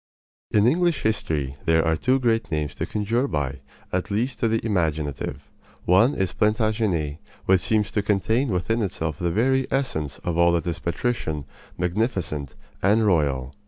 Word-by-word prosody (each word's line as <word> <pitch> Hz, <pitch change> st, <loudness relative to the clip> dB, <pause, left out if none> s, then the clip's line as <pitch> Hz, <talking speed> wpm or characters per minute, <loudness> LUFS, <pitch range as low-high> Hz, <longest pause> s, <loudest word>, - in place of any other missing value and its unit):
In 105 Hz, 0 st, +3 dB
English 170 Hz, +4 st, +2 dB
history 75 Hz, -11 st, -1 dB
there 80 Hz, 0 st, +3 dB
are 80 Hz, 0 st, +2 dB
two 130 Hz, +9 st, +2 dB
great 115 Hz, -2 st, +1 dB
names 75 Hz, -3 st, -1 dB
to -, -, -4 dB
conjure 115 Hz, +5 st, 0 dB
by, 70 Hz, -, -2 dB, 0.3 s
at 90 Hz, 0 st, -1 dB
least 115 Hz, +6 st, -1 dB
to 115 Hz, -, +2 dB
the 115 Hz, 0 st, +1 dB
imaginative. 80 Hz, -8 st, -1 dB, 0.4 s
One 110 Hz, +10 st, +4 dB
is 95 Hz, -2 st, -1 dB
Plantagenet, 105 Hz, -8 st, 0 dB, 0.3 s
which 95 Hz, -1 st, +4 dB
seems 105 Hz, -3 st, +1 dB
to 105 Hz, -, +1 dB
contain 110 Hz, +6 st, +1 dB
within 110 Hz, +5 st, 0 dB
itself 80 Hz, -6 st, -3 dB
the 85 Hz, -, 0 dB
very 130 Hz, +8 st, +2 dB
essence 80 Hz, -, -1 dB
of 85 Hz, -1 st, -1 dB
all 85 Hz, 0 st, +5 dB
that 85 Hz, -2 st, 0 dB
is 85 Hz, -2 st, -2 dB
patrician, 85 Hz, -, -2 dB, 0.3 s
magnificent, 90 Hz, -, -2 dB, 0.3 s
and 105 Hz, +3 st, +3 dB
royal. 70 Hz, -8 st, +1 dB
95 Hz, 160 wpm, -24 LUFS, 80-115 Hz, 0.4 s, all